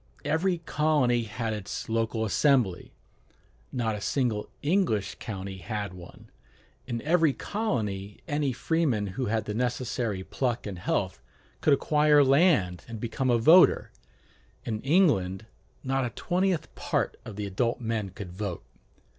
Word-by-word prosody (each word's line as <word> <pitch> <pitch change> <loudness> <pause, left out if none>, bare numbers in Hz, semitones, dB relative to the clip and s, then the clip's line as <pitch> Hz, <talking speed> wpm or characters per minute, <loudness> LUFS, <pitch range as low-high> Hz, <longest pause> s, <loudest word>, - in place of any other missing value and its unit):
Every 175 +3 +1
colony 150 -7 +1
had 110 +1 -3
its 105 -1 -5
local 115 0 0
assembly: 120 - +2 0.8
not 115 -3 -1
a 105 - -5
single 115 -3 -1
English 145 - +1
county 95 -2 -6
had 100 0 -4
one. 90 -1 -13 0.6
In 120 -2 -3
every 160 -1 +3
colony 105 - -3
any 145 -3 0
freeman 130 -5 0
who 130 +3 -2
had 110 +1 0
the 105 - -3
necessary 120 -4 -2
pluck 120 +3 -2
and 95 -4 -5
health 65 - -1 0.4
could 150 - +4
acquire 150 0 +4
land 135 - +3
and 115 -2 -7
become 120 +3 -2
a 120 - +4
voter: 160 +11 +6 0.7
in 110 -2 -3
England 130 - +2 0.4
not 135 0 0
a 120 - -1
twentieth 180 - -1
part - - -1
of 110 - -8
the 105 0 -4
adult 115 +5 -1
men 115 -4 -2
could 95 -1 -8
vote. 95 -1 -5
115 Hz, 140 wpm, -27 LUFS, 105-145 Hz, 0.8 s, voter